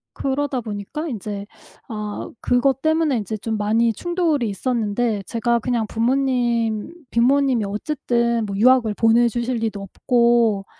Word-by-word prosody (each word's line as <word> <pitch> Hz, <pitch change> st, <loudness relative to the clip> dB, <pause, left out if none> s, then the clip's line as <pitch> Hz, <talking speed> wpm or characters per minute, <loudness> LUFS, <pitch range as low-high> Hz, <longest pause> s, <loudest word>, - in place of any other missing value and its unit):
그러다 275 Hz, -1 st, -1 dB
보니까 215 Hz, +9 st, -5 dB
인제 205 Hz, -, -5 dB, 0.4 s
아 210 Hz, -2 st, -5 dB
그것 255 Hz, +2 st, +2 dB
때문에 315 Hz, -4 st, +2 dB
인제 215 Hz, +1 st, -4 dB
좀 220 Hz, +1 st, -3 dB
많이 225 Hz, +2 st, +2 dB
충돌이 330 Hz, -, 0 dB
있었는데 220 Hz, -1 st, -1 dB
제가 235 Hz, +3 st, 0 dB
그냥 230 Hz, -1 st, -1 dB
부모님, 240 Hz, -1 st, 0 dB, 0.2 s
부모님이 255 Hz, 0 st, +3 dB
어쨌든 235 Hz, +1 st, -1 dB
뭐 200 Hz, -1 st, -5 dB
유학을 235 Hz, -1 st, +4 dB
보내주실 235 Hz, +2 st, +2 dB
리도 220 Hz, -3 st, -3 dB
없고 235 Hz, -1 st, +2 dB
235 Hz, 290 characters per minute, -21 LUFS, 215-255 Hz, 0.4 s, 유학을